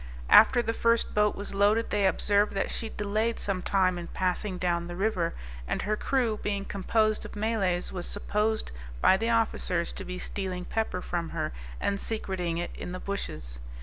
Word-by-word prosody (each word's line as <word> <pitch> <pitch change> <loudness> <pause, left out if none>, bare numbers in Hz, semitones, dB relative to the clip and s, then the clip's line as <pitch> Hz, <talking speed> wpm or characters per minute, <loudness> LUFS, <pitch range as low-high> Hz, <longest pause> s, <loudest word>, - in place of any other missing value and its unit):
After 245 -2 +8
the 225 - -1
first 230 0 +2
boat 210 0 +3
was 200 - -5
loaded, 205 +3 +3
they 205 -2 +3
observed 205 +2 +2
that 195 - 0
she 225 - -4
delayed 215 +3 -1
some 195 -2 -1
time 185 -2 +2
in 170 - -6
passing 185 +1 -1
down 175 -1 0
the 175 - -6
river, 185 -4 0 0.3
and - - -1
her 215 +1 +1
crew 235 -2 0
being 200 -1 -2
composed 215 +2 +1
of - - -9
Malays, 205 -5 0
was 180 -2 -5
supposed 210 +2 -1 0.3
by 190 - +6
the 225 +4 0
officers 215 -6 +1
to - - -6
be 180 - -5
stealing 185 -1 -4
pepper 220 -5 -2
from 170 -2 -2
her, - - -2 0.3
and 200 0 -1
secreting 185 -6 -2
it 175 - -3
in 180 - -6
the 185 - -4
bushes. 75 - -5
200 Hz, 180 wpm, -28 LUFS, 180-215 Hz, 0.3 s, After